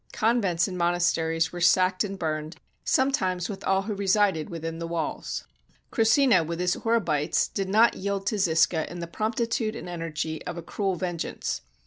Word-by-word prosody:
Convents 205 -7 +2
and 180 -2 -5
monasteries 170 -2 +1
were 175 - -5
sacked 185 +2 +4
and 195 -1 -5
burned, 155 -1 -3 0.3
sometimes 190 -10 +1
with 200 - -6
all 190 0 +2
who 210 +1 -3
resided 195 -4 +1
within 165 -1 -5
the 170 - -4
walls. 165 -2 -3 0.5
Krussina, 230 - +4
with 165 +1 -4
his 180 0 +2
Horebites, 170 -11 +1
did 195 -2 -3
not 220 +4 +5
yield 195 0 -3
to 215 0 0
Zisca 160 -2 +2
in 175 - -7
the 170 - -3
promptitude 225 +4 -1
and - - -7
energy 160 -2 -4
of 175 - -4
a 170 - -6
cruel 195 +2 -2
vengeance. 175 -1 -3
180 Hz, 165 wpm, -26 LUFS, 165-205 Hz, 0.5 s, not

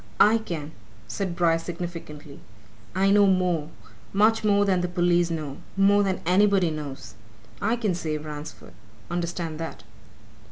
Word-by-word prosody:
"I 220 +2 +6
can!" 160 -8 -6 0.4
said 175 - -3
Bryce 165 -1 +2
significantly. 165 -4 -7 0.6
"I 195 +1 +3
know 205 0 +6
more 180 -5 +1 0.4
much 220 +3 +3
more 205 -1 +3
than 185 -2 +2
the 180 - -1
police 175 -1 +2
know 155 -4 -4 0.2
more 200 +1 +5
than 190 -2 -1
anybody 190 -1 +3
knows. 145 -7 -7 0.5
I 225 +3 +1
can 220 -6 -1
save 155 -3 -3
Ransford. 150 0 -8 0.4
Understand 170 -2 -3
that!" 165 -1 -6
175 Hz, 135 wpm, -25 LUFS, 160-195 Hz, 0.6 s, I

